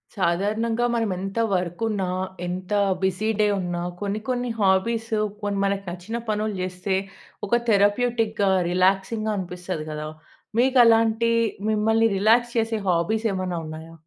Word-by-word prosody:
సాధారణంగా 215 +6 0
మనం 225 -2 0
ఎంత 195 +4 -4
వర్క్ 180 +1 -2
ఉన్న 205 -3 -1 0.4
ఎంత 185 +3 -4 0.3
బిజీ 190 +3 0
డే 210 - +4
ఉన్న 175 -1 -3 0.3
కొన్ని, 205 +1 -2
కొన్ని 245 -1 -1
హాబీస్ 220 +4 +1 0.3
కొన్ని 205 -1 -1
మనకు 200 0 -1
నచ్చిన 180 +6 -5
పనులు 215 0 -1
చేస్తే, 185 +1 -2 0.5
ఒక 235 - +3
థెరప్యూటిక్‌గా, 215 0 +2 0.2
రిలాక్సింగ్‌గా 195 +4 +1
అనిపిస్తది 180 -3 -5
కదా! 150 0 -5 0.5
మీకు 260 +2 +3
అలాంటి, 225 0 +3 0.4
మిమ్మల్ని 220 +1 +3
రిలాక్స్ 235 +4 +3
చేసే 225 0 +1
హాబీస్ 180 +6 +1
ఏమైనా 185 -2 -2
ఉన్నాయా? 160 +1 -9
205 Hz, 130 wpm, -24 LUFS, 185-225 Hz, 0.5 s, డే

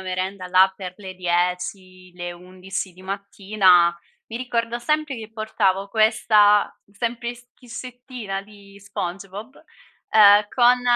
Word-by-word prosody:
merenda 185 0 -4
là 190 +1 +5
per 185 -2 -8
le 190 -3 -9
10, 180 +1 -2
le 175 0 -6
11 185 +1 -7
di 180 - -17
mattina, 190 -2 +2 0.3
mi 225 - -7
ricordo 235 -1 -2
sempre 305 +1 -1
che 220 -1 -9
portavo 200 -3 0
questa 215 -1 +3
sempli 235 +3 -3
schiscettina 245 -4 -8
di 200 -1 -17
Spongebob, 200 +4 -6 0.6
uhm, 205 -1 +7
con 245 0 +4
200 Hz, 115 wpm, -22 LUFS, 185-225 Hz, 0.6 s, uhm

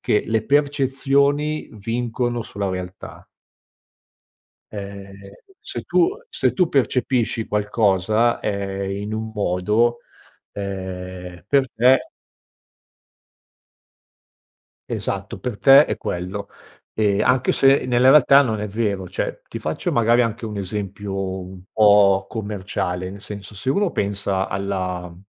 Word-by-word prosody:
che 105 - +1
le 110 -1 0
percezioni 140 +1 +1
vincono 120 +2 -2
sulla 100 -2 -4
realtà 90 0 -7 1.5
ehm, 100 -1 -9 0.3
se - - -6
tu 350 +1 +3 0.2
se - - 0
tu 180 -3 +2
percepisci 125 -4 0
qualcosa, 105 +2 +1
ehm, 100 -1 -3
in 100 +2 -4
un 110 0 -4
modo, 105 +5 +1 0.5
ehm, 90 -2 -6
per 135 -1 +2
te 125 +4 +4 2.8
Esatto - - -4
per 120 -4 -5
te 140 +2 +8
è - - -4
quello. 95 +3 -4 0.5
E 105 -2 +1
anche 125 0 +2
se 135 0 +4
nella 125 +1 +3
realtà 140 -1 +7
non 110 -6 0
è 105 - -2
vero. 100 -3 -2
Cioè - - -4
ti - - -7
faccio - - -3
magari 120 +1 +4
anche 115 0 -3
un 105 -1 -6
esempio 95 -1 -4
un 90 0 -11
po' 100 -2 +5
commerciale, 95 -4 -4
nel 100 +1 -10
senso 105 0 -9
se 105 +7 -6
uno 200 +6 +2
pensa 100 -1 -1
alla 90 -3 -3
105 Hz, 115 wpm, -21 LUFS, 95-120 Hz, 2.8 s, te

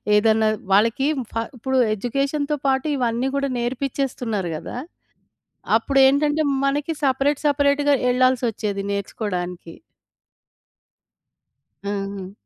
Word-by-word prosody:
ఏదన్నా 220 0 +3 0.2
వాళ్ళకి 230 +7 +3 0.2
ఫ - - -17 0.2
ఇప్పుడు 265 +3 -1 0.2
ఎడ్యుకేషన్‌తో 275 +6 -1
పాటు 265 +2 +1
ఇవన్నీ 245 +1 0
గూడా 275 -1 0
నేర్పిచ్చేస్తున్నారు 240 -6 -2
గదా! 240 - -7 1.0
అప్పుడేంటంటే, 280 +4 +3 0.2
మనకి 290 +3 0
సెపరేట్ 275 +2 +1
సెపరేట్‌గా 285 0 +3 0.2
ఎల్లాల్సొచ్చేది 235 -6 +1
నేర్చుకోవడానికి. 180 -4 -4 2.1
హుహు. 195 -1 -4
255 Hz, 80 wpm, -22 LUFS, 210-275 Hz, 2.1 s, ఏదన్నా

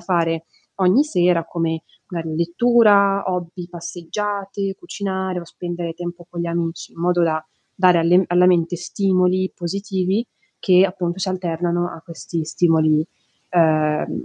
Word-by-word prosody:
fare, 165 -2 0 0.3
ogni 195 +9 +4
sera, 180 - +2
come 165 -1 -2 0.3
magari 165 -3 -4
lettura, 200 +2 +4
hobby, 175 -1 -4
passeggiate, 195 +3 -4
cucinare 190 - -4
o - - -9
spendere 175 0 -5
tempo 175 0 -7
con 175 - -6
gli 170 - -2
amici, 170 -1 -3
in - - -18
modo 175 0 +2
da 160 -1 0 0.3
dare 180 -2 +4
alle 175 +3 +4
alla 180 +1 +4
mente 175 -1 +3
stimoli 185 +1 +1
positivi, 195 +4 -2 0.3
che 185 -1 +5
appunto 180 -1 -2
si 190 - -1
alternano 175 -1 -1
a 160 - -10
questi 165 -1 -5
stimoli, 160 -1 +2 0.5
uhm, 155 -3 +2
175 Hz, 135 wpm, -21 LUFS, 170-190 Hz, 0.5 s, che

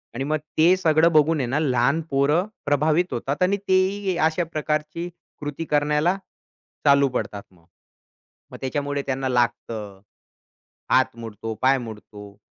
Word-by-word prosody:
आणि 135 - -2
मग 155 +2 0 0.2
ते 170 +4 +6
सगळं 165 -1 +3
बघून 155 0 +3
आहे 125 - -1
ना 140 +5 0
लहान 135 +2 +2
पोरं 145 +7 +2 0.2
प्रभावित 155 +5 +2
होतात 135 +6 -3
आणि 200 +2 +2
तेही 190 0 +1
अशा 165 +2 -1
प्रकारची 155 +3 -2 0.3
कृती 145 +3 -4
करण्याला 150 +5 +1 0.7
चालू 140 -1 +5
पडतात 105 -5 -4
मग. 85 -2 -24 0.9
मग - - -8
त्याच्यामुळे 145 +1 -2
त्यांना 130 0 -1
लागतं, 110 -5 -2 0.9
हात - - +3
मोडतो, 115 -1 -6
पाय 135 +1 +4
मोडतो. 105 -3 -10
145 Hz, 135 wpm, -23 LUFS, 125-160 Hz, 0.9 s, ते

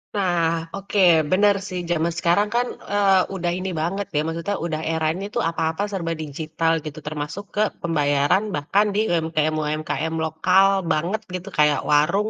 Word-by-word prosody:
Nah 170 -4 0
oke 200 +1 -3 0.3
bener 205 +2 +4
sih 185 -1 -4
zaman 170 0 0
sekarang 175 +4 +2
kan, 245 +1 +2 0.2
eee, 195 -2 +4
udah 175 -1 -1
ini 185 +1 -3
banget 195 +4 -2
ya - - +3
maksudnya 170 +5 -2
udah 160 -2 -2
eranya 160 +3 -1
itu 225 +3 -3
apa-apa 165 +2 -1
serba 170 -4 -2
digital 160 +2 -2
gitu 155 0 -6
termasuk 150 +5 -4
ke 210 - +2 0.2
pembayaran 145 +2 +2
bahkan 175 +8 +2
di - - +2
UMKM-UMKM 155 -1 -1
lokal 180 +5 +3 0.3
banget 175 +8 0
gitu 185 +2 -6
kayak 150 -2 +2
warung, 170 +9 +3
165 Hz, 150 wpm, -22 LUFS, 155-195 Hz, 0.3 s, bener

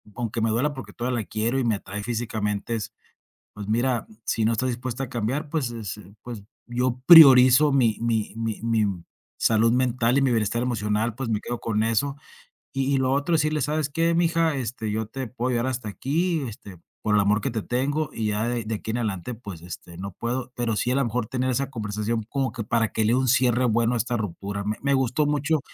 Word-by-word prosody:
aunque 120 -1 -3
me 115 - +2
duela, 140 +7 +1
porque 130 - -9
todavía 120 -1 -2
la - - -8
quiero 115 +6 -1
y - - 0
me 115 -3 +2
atrae 100 +1 -6
físicamente. 110 -2 -2 0.8
Pues 105 0 -8
mira, 120 +1 0 0.2
si 110 - 0
no 115 - +3
estás 130 +3 0
dispuesta 125 +2 -4
a - - -9
cambiar, 125 +7 -2
pues 145 -7 -1
es 110 -3 -5
es, 100 - -12 0.2
pues, 115 -5 -7 0.2
yo 125 +1 -1
priorizo 140 -3 +9
mi 120 -5 +3
mi 115 -3 0
mi 115 -2 -3
mi 115 -2 +2 0.5
salud 115 +1 +3
mental 125 0 +2
y - - +3
mi 135 - +3
bienestar 115 +1 0
emocional. 110 -2 -1
Pues, 130 0 -4
me 105 - 0
quedo 120 -1 -5
con 110 -1 0
eso, 135 +5 0 0.6
y 135 +1 0
y - - +2
lo 130 0 +1
otro 145 +4 +1
es 160 - +3
decirle: 155 -1 0
"¿Sabes 150 +1 0
qué? 165 +3 +1
Mija, 165 -2 +2
este 115 -3 -3
yo 110 0 -2
te 130 +2 -5
puedo 125 +2 -3
ayudar 120 +1 0
hasta 125 -4 -3
aquí, 160 - -1
este, 100 -5 -10 0.2
por 105 -1 +2
el 105 - +5
amor 105 +1 +2
que 135 - -2
te 110 -2 -3
tengo, 145 +5 -1
y 110 -1 -2
ya 105 +2 0
de 115 -2 -2
aquí 110 +1 -5
en 120 - -2
adelante, 105 +1 -3
pues, 100 -8 -9
este 85 0 -9
no 100 +1 -6
puedo", 125 +5 -3
pero 120 -3 -1
sí 125 - 0
a - - +1
lo 140 - +2
mejor 120 0 -1
tener 130 +1 -1
esa 135 +2 -1
conversación 110 0 -2
como 135 -2 -1
que 115 - -4
para 110 +1 +1
que 110 - +1
le 115 - +3
de - - +4
un 130 - 0
cierre 125 -1 +3
bueno 115 +1 +2
a - - +1
esta 120 +2 -1
ruptura. 100 0 -4
Me 105 +1 -2
me 140 0 +1
gustó 130 +3 +1
mucho 150 +1 +1
120 Hz, 225 wpm, -25 LUFS, 110-130 Hz, 0.8 s, priorizo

